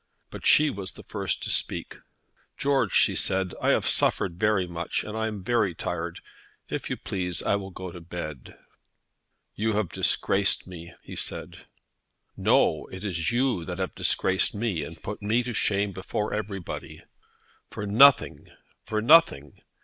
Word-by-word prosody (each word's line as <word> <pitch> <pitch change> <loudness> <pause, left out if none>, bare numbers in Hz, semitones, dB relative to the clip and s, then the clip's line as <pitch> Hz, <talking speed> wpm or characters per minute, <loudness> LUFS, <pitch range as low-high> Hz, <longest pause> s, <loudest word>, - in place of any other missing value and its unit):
But - - -4
she 150 -1 +6
was 95 -4 -6
the - - -12
first - - -3
to - - -2
speak. - - -1 0.6
"George," 140 -1 +1
she - - +4
said, 95 -1 0
"I - - +2
have - - +2
suffered 85 -2 +1
very 105 -3 +2
much, 85 -1 -3
and 105 - -7
am 110 -3 -3
very 110 -5 +1
tired. 85 +1 -4 0.5
If - - -4
you - - -2
please, 90 -3 -3
I - - +2
will 95 -1 -7
go 95 -1 -8
to 90 - -10
bed." 80 -6 -8 1.0
"You 110 +1 -1
have 105 -4 0
disgraced 100 0 +1
me," 85 -2 -10
he - - -9
said. - - -4 0.7
"No; 80 - +2
it 95 +1 -9
is 90 0 -1
you 120 -6 +1
that 90 0 -5
have 95 -1 -3
disgraced 95 +2 +1
me 100 -6 -1
and 80 +2 -10
put 105 - -6
me 110 +4 +1
to 120 0 -4
shame 100 -1 +1
before 95 +3 -3
everybody, 105 -4 -5 0.7
for 105 - -6
nothing, 130 +7 +5 0.4
for 110 -1 -2
nothing. 120 - +4
95 Hz, 155 wpm, -26 LUFS, 90-110 Hz, 1.0 s, she